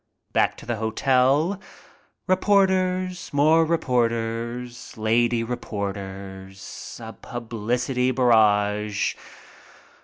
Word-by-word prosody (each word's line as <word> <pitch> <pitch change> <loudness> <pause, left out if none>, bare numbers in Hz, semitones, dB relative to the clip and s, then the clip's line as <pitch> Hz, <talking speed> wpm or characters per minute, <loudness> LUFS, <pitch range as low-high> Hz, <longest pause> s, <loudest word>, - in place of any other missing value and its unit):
Back - - +2
to - - -12
the 120 -1 -2
hotel. 135 - +2 0.6
Reporters. 185 -1 +1
More 155 +3 +4
reporters. 120 -5 -2
Lady 115 +2 +2
reporters. 100 -4 -6
A - - -8
publicity 120 +2 -2
barrage. 105 -4 +2
120 Hz, 70 wpm, -24 LUFS, 110-145 Hz, 0.6 s, More